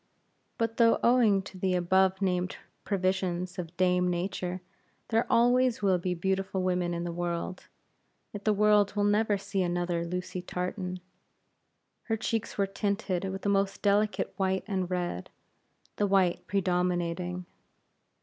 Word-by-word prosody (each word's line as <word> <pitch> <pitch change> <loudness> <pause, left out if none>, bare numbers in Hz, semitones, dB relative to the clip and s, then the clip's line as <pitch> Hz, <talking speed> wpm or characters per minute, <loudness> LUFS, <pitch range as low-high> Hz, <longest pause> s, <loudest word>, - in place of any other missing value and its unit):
But 230 -1 -1
though 230 -1 +5
owing 230 -5 +4
to 190 -1 -11
the 185 0 +1
above 190 +2 +2
named 180 -1 0 0.3
provisions 185 -2 -1
of 175 0 -6
dame 180 -1 +3
Nature, 180 0 -2 0.5
there 225 +1 +2
always 245 -1 +3
will 190 -2 +3
be 180 +1 -2
beautiful 190 +1 -1
women 180 -1 0
in 170 - -3
the 175 - -3
world; 175 +1 -4 0.7
yet 205 -1 -6
the 215 - +3
world 210 -1 +3
will 205 - +1
never 205 0 +2
see 200 0 -2
another 175 -1 -1
Lucy 180 +1 -4
Tartan. 180 0 -4 1.0
Her 225 -1 0
cheeks 225 0 -2
were 200 - +3
tinted 195 -2 -2
with 190 0 -5
the 205 - +1
most 195 0 0
delicate 205 +1 +1
white 190 -1 0
and 190 -4 -2
red, 175 - -3 0.7
the 205 - +2
white 190 -3 +2
predominating. 180 -1 -1
190 Hz, 140 wpm, -29 LUFS, 180-205 Hz, 1.0 s, though